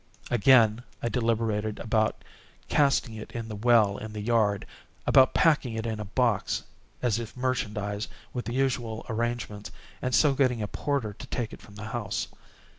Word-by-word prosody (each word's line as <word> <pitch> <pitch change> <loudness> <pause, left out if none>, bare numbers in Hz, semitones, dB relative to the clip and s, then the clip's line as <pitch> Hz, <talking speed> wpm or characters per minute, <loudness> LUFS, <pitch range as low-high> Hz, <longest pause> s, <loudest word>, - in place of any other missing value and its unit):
Again, 120 -2 +5 0.2
I 120 - +1
deliberated 115 -3 0
about 110 -1 0 0.4
casting 140 -5 +2
it 110 -1 -8
in 115 -1 -4
the 105 - -5
well 110 -2 +4
in 110 0 -7
the 105 - -5
yard—about 115 +3 +2
packing 150 -8 +3
it 110 0 -3
in 110 -2 -2
a 105 - -4
box, 115 +1 0 0.4
as 120 -3 +2
if 115 +1 -7
merchandise, 105 -5 -2 0.3
with 125 - -3
the 120 - -3
usual 120 -4 -1
arrangements, 115 -2 -3 0.3
and 130 -1 +1
so 145 -3 +5
getting 130 -5 +1
a - - -2
porter 135 -7 -2
to 105 - -10
take 120 -3 -3
it - - -11
from 105 -3 -15
the 105 +1 -7
house. 105 -4 -2
115 Hz, 165 wpm, -28 LUFS, 105-125 Hz, 0.4 s, Again